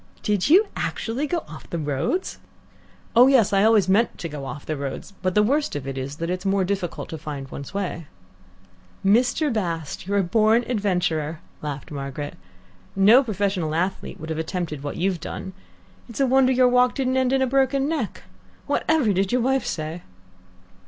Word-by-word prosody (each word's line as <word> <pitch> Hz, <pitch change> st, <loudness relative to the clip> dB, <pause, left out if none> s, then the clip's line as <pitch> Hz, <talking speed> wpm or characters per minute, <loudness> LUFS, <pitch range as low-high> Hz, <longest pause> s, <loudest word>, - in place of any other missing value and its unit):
"Did 210 Hz, +3 st, +1 dB
you 380 Hz, +7 st, +7 dB
actually 250 Hz, +6 st, -2 dB
go 340 Hz, +2 st, -1 dB
off 155 Hz, -, -11 dB
the 170 Hz, -, -3 dB
roads?" 150 Hz, -, -2 dB, 0.8 s
"Oh 245 Hz, +2 st, +8 dB
yes. 250 Hz, -7 st, +4 dB
I 195 Hz, 0 st, +4 dB
always 215 Hz, -4 st, +4 dB
meant 205 Hz, +5 st, +2 dB
to 165 Hz, -, -5 dB
go 145 Hz, -3 st, -7 dB
off 135 Hz, +2 st, -7 dB
the 155 Hz, -, -2 dB
roads, 140 Hz, +7 st, -6 dB
but 185 Hz, -1 st, -1 dB
the 210 Hz, -, +5 dB
worst 285 Hz, -, +1 dB
of 145 Hz, -2 st, -4 dB
it 135 Hz, -, -4 dB
is 135 Hz, +2 st, -4 dB
that 165 Hz, +3 st, -3 dB
it's 185 Hz, 0 st, -3 dB
more 195 Hz, -1 st, +2 dB
difficult 185 Hz, -2 st, -3 dB
to 160 Hz, -, -6 dB
find 145 Hz, -3 st, -6 dB
one's 140 Hz, -, -7 dB
way." 180 Hz, -5 st, -4 dB, 1.0 s
"Mr. 245 Hz, +7 st, +3 dB
Bast, 170 Hz, -5 st, -3 dB
you're 200 Hz, +1 st, +1 dB
a 200 Hz, -, +3 dB
born 220 Hz, +5 st, +3 dB
adventurer," 180 Hz, -8 st, -1 dB, 0.2 s
laughed 145 Hz, -2 st, -6 dB
Margaret. 140 Hz, 0 st, -5 dB, 0.6 s
"No 210 Hz, +7 st, +7 dB
professional 195 Hz, -8 st, -1 dB
athlete 180 Hz, +4 st, -2 dB
would 160 Hz, +1 st, -6 dB
have 160 Hz, -, -2 dB
attempted 160 Hz, -3 st, -3 dB
what 145 Hz, 0 st, -5 dB
you've 185 Hz, -1 st, 0 dB
done. 190 Hz, -, -6 dB, 0.6 s
It's 230 Hz, -, -8 dB
a 275 Hz, -, +4 dB
wonder 260 Hz, 0 st, +4 dB
your 255 Hz, 0 st, +4 dB
walk 250 Hz, 0 st, +3 dB
didn't 260 Hz, -1 st, 0 dB
end 260 Hz, -1 st, +2 dB
in 265 Hz, 0 st, +3 dB
a -, -, +3 dB
broken 270 Hz, +1 st, +2 dB
neck. 295 Hz, -9 st, -3 dB, 0.4 s
Whatever 295 Hz, -10 st, +2 dB
did 195 Hz, +1 st, 0 dB
your 250 Hz, 0 st, +2 dB
wife 265 Hz, +2 st, +1 dB
say?" 155 Hz, +2 st, -4 dB
195 Hz, 185 wpm, -23 LUFS, 160-250 Hz, 1.0 s, Oh